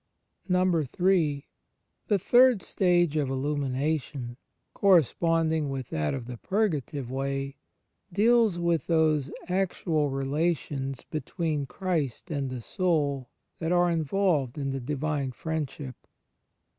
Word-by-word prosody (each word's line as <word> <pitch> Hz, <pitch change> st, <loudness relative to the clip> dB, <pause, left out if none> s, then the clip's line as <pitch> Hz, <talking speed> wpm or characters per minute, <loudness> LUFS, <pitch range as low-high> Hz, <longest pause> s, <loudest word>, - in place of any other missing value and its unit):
in. -, -, +2 dB
The 175 Hz, -, 0 dB
third 245 Hz, +1 st, +5 dB
stage 175 Hz, -4 st, +2 dB
of 145 Hz, -3 st, 0 dB
Illumination, 135 Hz, -1 st, -2 dB, 0.4 s
corresponding 165 Hz, -, +3 dB
with 135 Hz, -2 st, -4 dB
that 75 Hz, -, -1 dB
of 130 Hz, -3 st, -6 dB
the 125 Hz, 0 st, -7 dB
Purgative 150 Hz, -, -1 dB
Way, 135 Hz, +1 st, -3 dB, 0.5 s
deals 220 Hz, 0 st, +4 dB
with 170 Hz, -4 st, 0 dB
those 155 Hz, -4 st, +2 dB, 0.2 s
actual 175 Hz, -5 st, 0 dB
relations 135 Hz, -1 st, -1 dB
between 155 Hz, -2 st, -2 dB
Christ 170 Hz, -, -2 dB
and 140 Hz, -3 st, -2 dB
the 125 Hz, -1 st, -5 dB
soul 145 Hz, -4 st, 0 dB, 0.3 s
that 165 Hz, 0 st, -1 dB
are 175 Hz, 0 st, +3 dB
involved 160 Hz, -5 st, +1 dB
in 140 Hz, -2 st, -2 dB
the 135 Hz, -, -3 dB
Divine 140 Hz, 0 st, -2 dB
Friendship. 150 Hz, -3 st, -4 dB
155 Hz, 105 wpm, -27 LUFS, 135-175 Hz, 0.5 s, third